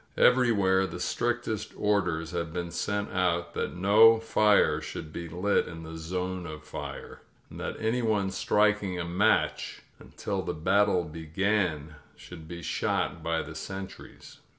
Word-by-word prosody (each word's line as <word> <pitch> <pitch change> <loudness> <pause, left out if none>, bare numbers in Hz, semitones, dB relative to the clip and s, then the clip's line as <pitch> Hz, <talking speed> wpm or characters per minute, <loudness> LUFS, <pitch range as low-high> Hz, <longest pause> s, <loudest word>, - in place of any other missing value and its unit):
Everywhere 100 -7 +4
the 85 0 -7
strictest 120 +1 -2
orders 90 -6 0
had 85 -2 -3
been 85 0 -4
sent 100 +3 -2
out 85 -2 0
that - - -3
no 105 +5 +6
fires 105 -2 +3
should 80 0 -7
be 85 -1 -6
lit 90 +5 +1
in 80 -2 -8
the 80 0 -8
"zone 90 +2 -4
of 75 0 -8
fire," - - -8 0.3
and - - -9
that - - -4
anyone 110 -4 0
striking 100 -2 +1
a 85 - -2
match 85 +2 +1 0.2
until - - -4
the - - -4
bat 100 +6 +3
tle 90 -3 +1
began 80 0 -1 0.2
should 80 -3 -12
be 85 0 -8
shot 80 - -1
by 80 0 -1
the 75 - -9
sentries. 95 +4 -9
90 Hz, 150 wpm, -28 LUFS, 80-105 Hz, 0.3 s, no